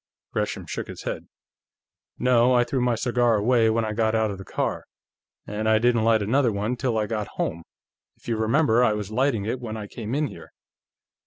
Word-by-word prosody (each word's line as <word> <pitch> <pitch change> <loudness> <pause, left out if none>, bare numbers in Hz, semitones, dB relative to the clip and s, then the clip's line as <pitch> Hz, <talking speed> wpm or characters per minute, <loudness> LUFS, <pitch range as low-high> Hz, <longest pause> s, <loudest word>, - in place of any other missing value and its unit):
Gresham - - -2
shook - - -5
his - - -9
head. - - -5 0.9
"No. 125 0 +4
I 120 - +5
threw 130 +1 -2
my 120 -1 +2
cigar 120 0 +2
away 115 +2 +3
when 110 0 +1
I 110 - -3
got 110 0 +1
out 110 -1 +1
of 100 - -7
the - - -7
car, - - -3 0.6
and 110 +1 -2
I 110 - +5
didn't 120 0 +2
light 110 -2 +3
another 120 +3 +2
one 105 +4 -1
till 125 -2 -1
I 105 - +1
got 105 -1 -3
home. 85 - -2 0.6
If - - -20
you 115 - 0
remember, 115 +2 +3
I 110 -3 +3
was 105 -1 -4
lighting 125 -3 +1
it 120 +4 -2
when 110 -2 -5
I 105 - -5
came 110 +3 -5
in 150 +1 +1
here." - - -10
115 Hz, 210 wpm, -25 LUFS, 110-125 Hz, 0.9 s, I